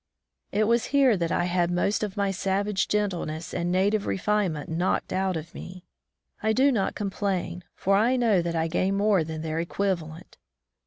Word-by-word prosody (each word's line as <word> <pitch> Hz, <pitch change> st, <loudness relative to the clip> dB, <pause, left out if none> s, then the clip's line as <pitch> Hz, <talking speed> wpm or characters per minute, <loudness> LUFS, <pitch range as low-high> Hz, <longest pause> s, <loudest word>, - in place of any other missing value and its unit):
It 210 Hz, -, +2 dB
was 235 Hz, +2 st, +2 dB
here 275 Hz, -5 st, +4 dB
that 170 Hz, -2 st, -1 dB
I -, -, +1 dB
had 175 Hz, -1 st, +1 dB
most 180 Hz, +4 st, 0 dB
of 210 Hz, -2 st, -4 dB
my 200 Hz, -1 st, +1 dB
savage 195 Hz, +2 st, 0 dB
gentleness 175 Hz, -6 st, -2 dB
and 175 Hz, +1 st, -1 dB
native 200 Hz, +3 st, +1 dB
refinement 190 Hz, -6 st, 0 dB
knocked 170 Hz, +3 st, -1 dB
out 190 Hz, -2 st, 0 dB
of 160 Hz, +1 st, -8 dB
me. 180 Hz, 0 st, -10 dB, 0.6 s
I 220 Hz, 0 st, +2 dB
do 270 Hz, +4 st, +4 dB
not 210 Hz, -7 st, 0 dB
complain, 190 Hz, -3 st, -2 dB
for 195 Hz, +1 st, +1 dB
I 230 Hz, +6 st, +3 dB
know 225 Hz, -7 st, +3 dB
that 170 Hz, 0 st, -3 dB
I 165 Hz, 0 st, +1 dB
gained 185 Hz, +4 st, 0 dB
more 200 Hz, -4 st, +3 dB
than 155 Hz, 0 st, -6 dB
their 160 Hz, 0 st, -2 dB
equivalent. 170 Hz, -2 st, -3 dB
190 Hz, 175 wpm, -26 LUFS, 170-210 Hz, 0.6 s, here